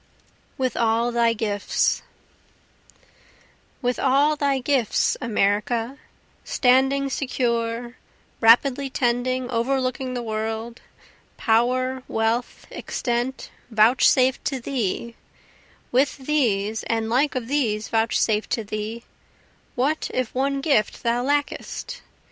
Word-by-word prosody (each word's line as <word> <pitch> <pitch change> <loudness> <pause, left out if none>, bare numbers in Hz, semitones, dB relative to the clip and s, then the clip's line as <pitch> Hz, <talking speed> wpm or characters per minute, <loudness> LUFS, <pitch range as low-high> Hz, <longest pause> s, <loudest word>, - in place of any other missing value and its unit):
With 255 -1 -1
All 230 +1 +1
Thy 235 -1 +2
Gifts 210 -2 0 1.8
With 245 0 0
all 280 +3 +3
thy 280 -2 +1
gifts 260 -3 +1
America, 225 +3 0 0.4
Standing 270 +2 +2
secure, 235 -2 -2 0.4
rapidly 255 +4 +4
tending, 255 0 0
overlooking 255 +1 -1
the 245 - -3
world, 220 +1 -4 0.6
Power, 255 +3 +1
wealth, 225 +2 -1
extent, 245 +2 -3 0.2
vouchsafed 250 +3 +4
to 270 -2 -1
thee 235 -2 -3 0.8
with 265 +3 +2
these 225 -7 0
and 225 -1 -1
like 265 +6 +1
of 245 -3 -3
these 230 -7 0
vouchsafed 225 -1 +1
to 230 -3 -1
thee, 215 +3 -5 0.7
What 285 +5 0
if 255 -2 -1
one 275 +1 0
gift 275 -8 +1
thou 235 0 +1
lackest? 285 +2 -2
245 Hz, 100 wpm, -23 LUFS, 225-265 Hz, 1.8 s, rapidly